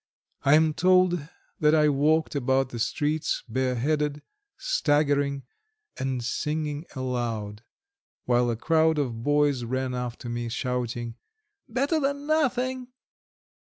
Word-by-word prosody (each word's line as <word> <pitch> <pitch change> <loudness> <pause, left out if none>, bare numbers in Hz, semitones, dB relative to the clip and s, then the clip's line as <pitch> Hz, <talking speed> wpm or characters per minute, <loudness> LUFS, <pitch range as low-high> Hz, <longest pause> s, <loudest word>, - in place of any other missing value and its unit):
I 140 +2 +5
am 155 0 +4
told 180 -2 +3 0.3
that 150 0 +4
I 150 -1 +4
walked 150 +3 +2
about 135 -1 +1
the 120 - -6
streets 150 +6 -1
bareheaded, 135 +5 -1 0.3
staggering, 145 - +1 0.5
and 130 -2 -2
singing 150 +4 -2
aloud, 115 -5 -3 0.6
while 120 0 +2
a 115 - 0
crowd 160 +3 +2
of 120 -6 -2
boys 145 -1 +2
ran 130 +2 -2
after 125 0 -5
me, 120 0 -3
shouting: 120 -1 -3 0.5
"Better 275 +7 +1
than 280 0 -1
nothing!" 260 -4 0
145 Hz, 115 wpm, -26 LUFS, 125-160 Hz, 0.6 s, I